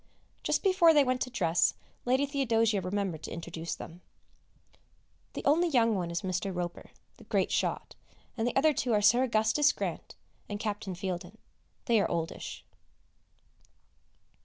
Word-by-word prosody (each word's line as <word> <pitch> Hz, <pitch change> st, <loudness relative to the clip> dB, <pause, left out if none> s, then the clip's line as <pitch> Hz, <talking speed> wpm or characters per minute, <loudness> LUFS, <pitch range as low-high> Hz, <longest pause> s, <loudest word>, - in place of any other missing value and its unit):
Just -, -, 0 dB
before 370 Hz, -5 st, +5 dB
they 290 Hz, -, +6 dB
went 255 Hz, -1 st, -1 dB
to 255 Hz, -, -1 dB
dress 170 Hz, -8 st, +2 dB, 0.3 s
Lady 260 Hz, +3 st, +2 dB
Theodosia 230 Hz, -7 st, +1 dB
remembered 185 Hz, -3 st, -2 dB
to -, -, -7 dB
introduce 170 Hz, 0 st, -5 dB
them. 170 Hz, +2 st, -10 dB, 1.3 s
The -, -, -6 dB
only 335 Hz, +5 st, +3 dB
young 230 Hz, -6 st, +3 dB
one 180 Hz, -4 st, -2 dB
is 170 Hz, 0 st, -3 dB
Mr. 185 Hz, +1 st, -2 dB
Roper, 175 Hz, -1 st, -5 dB, 0.3 s
the -, -, -15 dB
great -, -, 0 dB
shot, -, -, -1 dB, 0.4 s
and 230 Hz, -1 st, -1 dB
the 245 Hz, -, -2 dB
other 305 Hz, +3 st, +4 dB
two 245 Hz, -3 st, -1 dB
are 210 Hz, -, +3 dB
Sir 240 Hz, +4 st, +5 dB
Augustus 235 Hz, +4 st, +3 dB
Grant -, -, -5 dB, 0.3 s
and 205 Hz, 0 st, -4 dB
Captain 205 Hz, -3 st, -3 dB
Fieldin; 180 Hz, +2 st, -5 dB, 0.5 s
they 230 Hz, -5 st, +3 dB
are -, -, 0 dB
oldish. 165 Hz, -1 st, -4 dB
220 Hz, 150 wpm, -30 LUFS, 180-255 Hz, 1.3 s, they